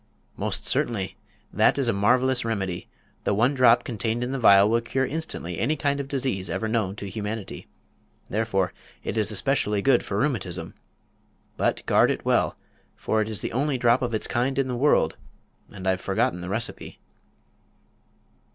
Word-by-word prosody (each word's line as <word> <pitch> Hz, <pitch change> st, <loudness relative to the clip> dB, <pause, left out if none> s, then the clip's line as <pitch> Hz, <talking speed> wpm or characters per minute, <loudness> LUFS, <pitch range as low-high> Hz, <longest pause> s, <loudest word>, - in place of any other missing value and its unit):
"Most -, -, -2 dB
certainly. 100 Hz, -6 st, -1 dB, 0.4 s
That -, -, +4 dB
is 135 Hz, -3 st, 0 dB
a 115 Hz, -, +2 dB
marvelous 125 Hz, +5 st, +2 dB
remedy. 95 Hz, -6 st, -3 dB, 0.4 s
The 100 Hz, -, +1 dB
one 120 Hz, +7 st, +3 dB
drop 120 Hz, -2 st, +5 dB
contained 115 Hz, 0 st, -2 dB
in 125 Hz, -, -3 dB
the 135 Hz, -, -2 dB
vial 100 Hz, -3 st, +7 dB
will 115 Hz, +2 st, +2 dB
cure 130 Hz, +3 st, -1 dB
instantly 130 Hz, -, -4 dB
any 145 Hz, +7 st, +1 dB
kind 140 Hz, -1 st, 0 dB
of 140 Hz, -, -4 dB
disease 130 Hz, -9 st, -2 dB
ever 110 Hz, -, -2 dB
known 110 Hz, -4 st, -1 dB
to 100 Hz, -, -7 dB
humanity. 105 Hz, +1 st, -5 dB, 0.6 s
Therefore 100 Hz, -4 st, 0 dB, 0.3 s
it -, -, -3 dB
is 110 Hz, -2 st, +2 dB
especially 105 Hz, -2 st, 0 dB
good 135 Hz, -3 st, +4 dB
for -, -, -3 dB
rheumatism. 95 Hz, -, -2 dB, 0.8 s
But -, -, -1 dB
guard -, -, +4 dB
it -, -, -2 dB
well, -, -, +2 dB, 0.4 s
for 110 Hz, -, 0 dB
it 110 Hz, -, -2 dB
is 110 Hz, -3 st, -3 dB
the -, -, -4 dB
only 140 Hz, +2 st, 0 dB
drop 120 Hz, 0 st, +3 dB
of 120 Hz, -3 st, -1 dB
its 110 Hz, -, -1 dB
kind 130 Hz, +3 st, 0 dB
in 135 Hz, -1 st, +1 dB
the 125 Hz, -, -2 dB
world, 145 Hz, +5 st, +2 dB, 0.5 s
and 95 Hz, -2 st, -7 dB
I've 95 Hz, 0 st, +1 dB
forgotten 90 Hz, -2 st, 0 dB
the 90 Hz, -, -6 dB
recipe." 110 Hz, +4 st, -4 dB
115 Hz, 170 wpm, -25 LUFS, 100-130 Hz, 0.8 s, vial